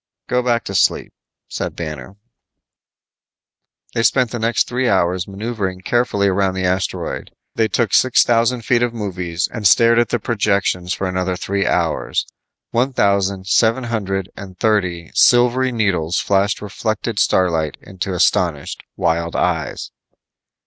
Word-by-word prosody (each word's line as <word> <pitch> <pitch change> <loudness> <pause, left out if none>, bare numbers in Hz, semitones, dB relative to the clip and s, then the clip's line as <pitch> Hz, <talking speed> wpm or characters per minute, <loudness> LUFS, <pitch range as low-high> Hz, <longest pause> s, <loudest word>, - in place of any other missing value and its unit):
"Go 125 0 +1
back 120 -2 0
to - - -6
sleep," - - +1 0.3
said - - -4
Banner. 75 0 -7 1.8
They 115 - 0
spent 125 +1 +2
the 120 - -4
next 115 0 +1
three 125 0 0
hours 90 -1 +1
maneuvering 100 -2 -4
carefully 105 -2 +1
around 95 -1 +1
the 95 0 -1
asteroid. 95 +1 -2 0.2
They 110 - +1
took 110 0 -1
six 130 -1 +5
thousand 120 0 +1
feet 120 -1 +2
of 120 -1 0
movies 90 -5 -3
and 110 -4 +2
stared 115 +2 +5
at 120 - +1
the - - +1
projections 100 -5 0
for 95 - -2
another 90 0 -1
three 100 +3 -2
hours. 85 -3 0 0.5
One 125 +3 0
thousand 100 -3 +1
seven 115 +6 +2
hundred 100 -5 -3
and 95 -2 -10
thirty 90 -6 0
silvery 125 +1 +4
needles 95 -7 0
flashed 100 +1 +1
reflected 110 +1 -3
starlight 80 -5 +1
into 95 0 -5
astonished, 85 -4 0
wild 85 0 -1
eyes. - - -2
100 Hz, 140 wpm, -19 LUFS, 90-115 Hz, 1.8 s, six